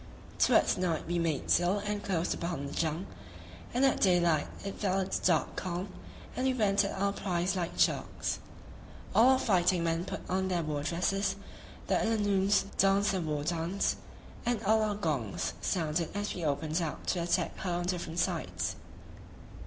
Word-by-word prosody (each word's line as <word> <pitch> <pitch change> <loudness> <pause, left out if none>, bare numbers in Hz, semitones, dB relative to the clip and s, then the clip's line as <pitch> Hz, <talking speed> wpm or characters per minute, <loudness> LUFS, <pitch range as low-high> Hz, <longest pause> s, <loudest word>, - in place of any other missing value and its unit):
Towards - - +4
night 170 -4 0
we 175 +1 -1
made 160 -5 -1
sail 175 +3 +3
and 205 0 -3
closed 180 -4 0
upon 170 -5 -3
the 140 - -6
junk, 165 +3 -1 0.6
and 255 +3 +3
at 270 - +2
daylight 175 -5 +3 0.2
it 195 - -5
fell 195 -2 +1
a 190 - -2
stark - - +1
calm, 185 +1 -3 0.5
and 260 - 0
we 260 - +1
went 205 -4 +3
at 200 -1 -3
our 200 0 +1
prize 180 -1 -1
like 175 -2 -3
sharks. - - 0 0.7
All 235 +4 +6
our - - +3
fighting 185 -7 +2
men 165 +1 0
put - - -6
on 190 +1 0
their 175 -2 0
war 150 -2 -2
dresses; 190 +5 0 0.5
the - - +1
Illanoons 205 -3 +2
danced 195 +1 +4
their 190 -2 -1
war 150 -3 -2
dance, 170 +4 0 0.5
and 235 -2 -1
all 220 +2 +4
our 210 -1 0
gongs 145 - -2
sounded 165 -2 0
as 205 0 -2
we 175 - -5
opened 155 +3 0
out 160 -3 -4
to 180 - 0
attack 175 +1 0
her 185 - -3
on 175 0 -1
different 175 -2 -3
sides. 90 - -1
180 Hz, 170 wpm, -31 LUFS, 165-200 Hz, 0.7 s, All